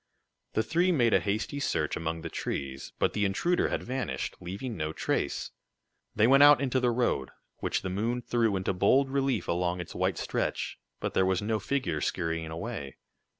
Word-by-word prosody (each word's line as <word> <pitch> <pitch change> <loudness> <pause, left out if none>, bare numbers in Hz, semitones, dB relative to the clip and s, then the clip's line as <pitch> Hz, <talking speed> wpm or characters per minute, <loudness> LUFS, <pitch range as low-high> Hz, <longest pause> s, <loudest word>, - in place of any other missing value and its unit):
The 110 - +2
three 170 - +2
made 120 -9 +3
a - - +6
hasty 110 +7 -2
search 145 - 0
among 80 0 -3
the - - -5
trees, 65 -1 -4
but - - +1
the 105 - 0
intruder 135 - +2
had - - -2
vanished, 125 - -3
leaving 100 +7 -5
no 80 -1 -3
trace. - - -1 0.6
They 105 - +4
went 135 +3 +6
out 145 -2 +9
into 130 -1 +1
the 125 -1 +2
road, 120 - 0 0.3
which - - -1
the 95 - -2
moon 115 +6 -1
threw 115 -4 +1
into 95 0 0
bold 130 +9 +3
relief 135 -1 0
along 90 +1 0
its 85 - -6
white - - 0
stretch, - - -2 0.2
but - - -3
there - - +3
was 95 0 +1
no 110 +1 0
figure 130 - -1
scurrying 80 -2 -1
away. 80 - -5
110 Hz, 185 wpm, -29 LUFS, 90-130 Hz, 0.6 s, out